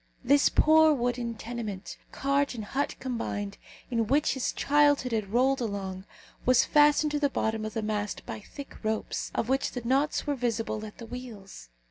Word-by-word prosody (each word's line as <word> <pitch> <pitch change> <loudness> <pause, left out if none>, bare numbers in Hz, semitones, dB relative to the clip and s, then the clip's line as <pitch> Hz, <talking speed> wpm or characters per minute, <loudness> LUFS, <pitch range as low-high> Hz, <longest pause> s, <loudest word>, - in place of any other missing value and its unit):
This 280 +3 +5
poor 315 0 +5
wooden 240 -2 -2
tenement, 220 -4 -6 0.2
cart 275 -1 0
and 220 -3 -5
hut 275 +7 -2
combined, 205 -5 -4 0.3
in 230 -2 +1
which 285 +5 +2
his 265 -2 -1
childhood 290 -3 +3
had 215 -3 -2
rolled 260 +3 +2
along, 195 -4 -4 0.4
was 255 -1 +4
fastened 295 0 +4
to 295 - 0
the 285 -1 +2
bottom 220 -4 -1
of 215 - -6
the 225 - -1
mast 210 -1 -3
by 230 -2 -6
thick 275 +6 -11
ropes, 220 0 -2
of 225 - 0
which 265 +2 0
the 245 - -5
knots 275 +5 +1
were 290 - 0
visible 230 -4 -2
at 210 - -13
the 230 - -8
wheels. 220 - -9
240 Hz, 175 wpm, -28 LUFS, 215-275 Hz, 0.4 s, This